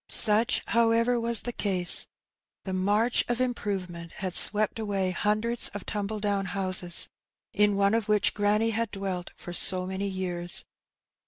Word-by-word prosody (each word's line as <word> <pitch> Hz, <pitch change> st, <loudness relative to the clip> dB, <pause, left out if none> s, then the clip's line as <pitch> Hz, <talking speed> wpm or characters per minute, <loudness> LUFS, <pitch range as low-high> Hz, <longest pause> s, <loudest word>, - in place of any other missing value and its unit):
Such, 220 Hz, +3 st, +6 dB
however, 230 Hz, +1 st, +1 dB
was 230 Hz, -1 st, 0 dB
the 240 Hz, -, -6 dB
case. 185 Hz, -5 st, +1 dB, 0.6 s
The 190 Hz, -, -6 dB
march 205 Hz, +6 st, 0 dB
of 240 Hz, 0 st, -3 dB
improvement 190 Hz, -9 st, -5 dB
had 185 Hz, -2 st, -5 dB
swept 215 Hz, +3 st, +4 dB
away 195 Hz, -4 st, -3 dB
hundreds 215 Hz, +5 st, 0 dB
of 205 Hz, -, -8 dB
tumble 210 Hz, 0 st, -5 dB
down 200 Hz, -1 st, -2 dB
houses, 185 Hz, -2 st, +1 dB, 0.5 s
in 205 Hz, 0 st, +1 dB
one 200 Hz, +1 st, +1 dB
of 225 Hz, -2 st, -2 dB
which 210 Hz, -1 st, +1 dB
granny 210 Hz, +2 st, 0 dB
had 230 Hz, 0 st, -3 dB
dwelt 195 Hz, -3 st, -6 dB
for 175 Hz, -, -10 dB
so 185 Hz, +1 st, +4 dB
many 190 Hz, +2 st, -5 dB
years. 180 Hz, -2 st, 0 dB
205 Hz, 150 wpm, -26 LUFS, 185-225 Hz, 0.6 s, Such